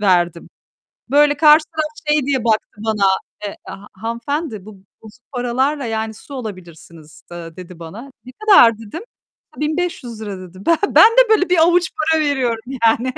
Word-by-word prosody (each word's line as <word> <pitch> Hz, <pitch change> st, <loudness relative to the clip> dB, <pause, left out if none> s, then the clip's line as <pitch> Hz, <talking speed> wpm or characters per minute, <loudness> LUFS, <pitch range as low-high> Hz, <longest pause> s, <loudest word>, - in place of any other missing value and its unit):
verdim. 175 Hz, -4 st, +1 dB, 0.6 s
Böyle 290 Hz, +1 st, +3 dB
karşıdan 310 Hz, +1 st, +4 dB, 0.3 s
şey 300 Hz, -3 st, +2 dB
diye 265 Hz, -4 st, -1 dB
baktı 220 Hz, -2 st, 0 dB, 0.2 s
bana, 215 Hz, -2 st, 0 dB, 0.4 s
eee, 200 Hz, -, -6 dB
"Ha 205 Hz, +1 st, -10 dB
hanımefendi 235 Hz, -, -4 dB
bu 215 Hz, -, -10 dB, 0.3 s
bozuk 220 Hz, +3 st, -16 dB
paralarla, 260 Hz, +3 st, -1 dB
yani 220 Hz, -1 st, -3 dB
,su 275 Hz, +6 st, -12 dB
alabilirsiniz." 170 Hz, -, -11 dB
da 170 Hz, -1 st, -9 dB
dedi 180 Hz, -1 st, -11 dB
bana. 210 Hz, +12 st, -10 dB
"Ne 255 Hz, -, -11 dB
kadar?" 260 Hz, -, +5 dB
dedim. 225 Hz, -, -8 dB, 0.5 s
A, -, -, -10 dB
₺1.500 255 Hz, -, -4 dB
dedi. 185 Hz, 0 st, -12 dB
Ben 335 Hz, -, +3 dB
ben 440 Hz, -, +6 dB
de -, -, +4 dB
böyle 400 Hz, -4 st, +3 dB
bir 360 Hz, -, +3 dB
avuç 345 Hz, +1 st, +3 dB, 0.2 s
para 320 Hz, -1 st, +3 dB
veriyorum, 255 Hz, -6 st, -1 dB, 0.2 s
yani 240 Hz, +3 st, +2 dB
240 Hz, 155 wpm, -18 LUFS, 205-300 Hz, 0.6 s, ben